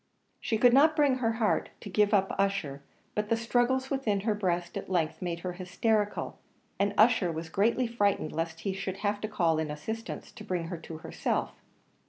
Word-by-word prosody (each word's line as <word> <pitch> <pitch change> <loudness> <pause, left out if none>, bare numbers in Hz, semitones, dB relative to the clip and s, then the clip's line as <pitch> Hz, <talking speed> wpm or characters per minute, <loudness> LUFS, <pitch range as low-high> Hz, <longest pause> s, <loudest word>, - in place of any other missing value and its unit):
She 225 - -1
could 245 +2 +5
not 305 +4 +6
bring 285 -4 +3
her 225 -2 +1
heart 225 -1 +1
to - - -8
give 205 +2 +2
up 195 -2 +2
Ussher; 195 -9 0 0.3
but 210 0 -2
the 230 - +3
struggles 245 +3 +1
within 225 -8 0
her 215 +1 +1
breast 175 -4 -1
at - - -5
length 170 -4 0
made 170 -2 -3
her 180 0 -3
hysterical, 205 +4 -1 0.4
and 200 0 +1
Ussher 215 -5 +5
was 160 0 -5
greatly 225 +8 +2
frightened 205 -8 0
lest 165 0 -3
he 195 - -2
should 190 0 -4
have 205 0 0
to 215 - -2
call 170 -7 +1
in 160 -1 -2
assistance 220 +10 -5
to - - -11
bring 170 -3 -3
her 175 - -4
to 160 0 -8
herself. 160 - -2
200 Hz, 195 wpm, -29 LUFS, 175-225 Hz, 0.4 s, not